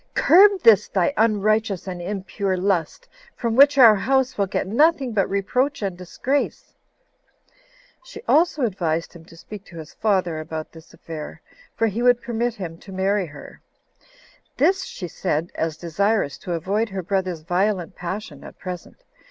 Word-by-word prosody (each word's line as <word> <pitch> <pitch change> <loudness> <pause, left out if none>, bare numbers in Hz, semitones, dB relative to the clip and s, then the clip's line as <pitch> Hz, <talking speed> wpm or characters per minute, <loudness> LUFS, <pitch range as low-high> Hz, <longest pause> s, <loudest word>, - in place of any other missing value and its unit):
Curb 390 +2 +5
this 220 -3 +6
thy 190 +7 0
unrighteous 215 -2 +1
and 180 -2 -6
impure 195 0 -3
lust, 185 - -1 0.3
from 230 -2 -2
which 280 +2 +6
our 235 -5 +9
house 265 +5 +1
will 200 -1 0
get - - -2
nothing 270 - +2
but 195 -3 +1
reproach 250 +7 -1
and 195 -3 -2
disgrace." 250 +10 -3 1.3
She - - -11
also 315 -3 +3
advised 170 -6 -2
him 165 -2 -14
to 165 - -16
speak 205 +3 -10
to 170 - -13
his 155 -1 -10
father 185 -7 0
about 155 0 -6
this 160 -1 -15
affair; 160 -1 -9 0.4
for 225 - +1
he 225 +1 -2
would 245 0 +4
permit 235 0 -2
him 170 -6 -7
[to 195 - -13
marry 190 0 0
her]. 145 -1 -13 1.0
This 380 0 +2
she 180 - -7
said, 160 +1 -2
as 160 -1 -3
desirous 180 -1 -1
to 180 - -5
avoid 200 +7 -1
her 190 -1 -5
brother's 185 -3 -2
violent 180 +2 -1
passion 175 -4 -6
at - - -12
present. 180 - -8
195 Hz, 160 wpm, -22 LUFS, 175-230 Hz, 1.3 s, our